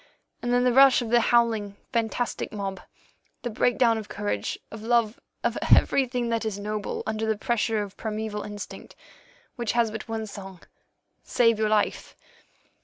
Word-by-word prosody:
And 240 - -2
then 245 0 +3
the 250 -1 +3
rush 270 -1 +7
of 230 - -6
the 240 0 +5
howling, 225 -4 +2 0.2
fantastic 230 +1 -1
mob, 195 -2 -4 0.6
the 240 - -3
breakdown 235 0 +2
of 215 - -9
courage, 105 0 -2
of 225 - -8
love, 230 -1 +1 0.2
of - - 0
everything 250 -3 +3
that 230 0 0
is 215 -3 -3
noble 210 0 -4
under 220 0 -2
the 220 -1 +1
pressure 220 -1 0
of 200 -1 -10
primæval 215 -1 -4
instinct, 205 0 -8 0.6
which 235 -2 -1
has 235 -2 +2
but 220 0 -6
one 225 -1 -3
song—Save 205 +3 -3
your 215 -1 +2
life. 215 -1 0
220 Hz, 155 wpm, -26 LUFS, 210-235 Hz, 0.6 s, rush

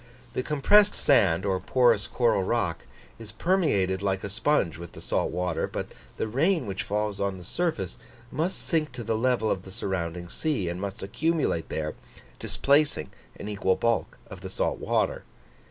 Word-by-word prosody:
The - - 0
compressed 200 +10 +4
sand, 95 - +3
or 95 -2 +1
porous 120 -4 +3
coral 120 -5 +2
rock, 95 -4 -1 0.3
is 110 -2 -9
permeated 110 - +1
like 95 -1 -1
a 100 - -4
sponge 100 - +1
with 85 -1 -9
the - - -10
salt - - 0
water, 90 -2 -1
but - - -5 0.3
the - - -1
rain 160 - +2
which 95 -1 -3
falls 105 -1 -2
on 100 -1 -1
the 90 - -10
surface 165 - -2 0.3
must 170 +5 -1
sink 155 -6 0
to 125 -1 -5
the 110 - 0
level 115 -1 +2
of 95 - -1
the 95 - -12
surrounding 90 -3 -3
sea, 130 - -1
and 90 +2 -4
must 100 -1 -5
accumulate 150 - 0
there, 75 -1 -2 0.5
displacing 140 - +2 0.3
an - - -6
equal 100 -3 +1
bulk 115 -1 0
of - - -10
the - - -6
salt - - -1
water. - - 0
105 Hz, 170 wpm, -27 LUFS, 95-140 Hz, 0.5 s, compressed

